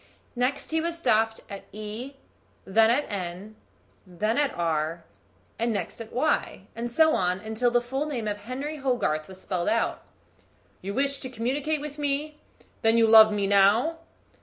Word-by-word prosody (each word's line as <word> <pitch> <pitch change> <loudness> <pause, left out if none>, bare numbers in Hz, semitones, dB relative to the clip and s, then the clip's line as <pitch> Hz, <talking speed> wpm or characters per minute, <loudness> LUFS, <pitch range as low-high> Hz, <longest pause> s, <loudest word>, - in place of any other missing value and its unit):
Next 255 +5 -1
he 320 0 +1
was 335 +1 -2
stopped 225 -8 +1
at 200 -1 -9
E, 215 +6 -6 0.5
then 220 +3 +4
at 265 +5 +2
N, 190 +2 -6 0.5
then 215 +8 -1
at 290 -2 +2
R, 165 0 -1 0.6
and 230 +1 +1
next 200 +1 -4
at 225 - -9
Y; 270 +5 0
and 235 +1 -3
so 315 +6 +4
on, 185 +4 -1
till 245 +2 +2
the 240 0 +1
full 265 +5 -2
name 240 -7 -3
of 205 -1 -2
Henry 260 +8 -5
Hogarth 245 - -1
was 190 0 -12
spelled 180 0 -2
out. 230 +1 0 0.8
"You 200 +1 -5
wish 275 +1 +1
to 260 - -5
communicate 270 +6 -2
with 295 0 -7
me; 295 +1 -2 0.4
then 225 +1 +3
you 230 - +5
love 220 -1 +8
me 205 -1 0
now?" 205 +11 +3
230 Hz, 165 wpm, -26 LUFS, 205-275 Hz, 0.8 s, love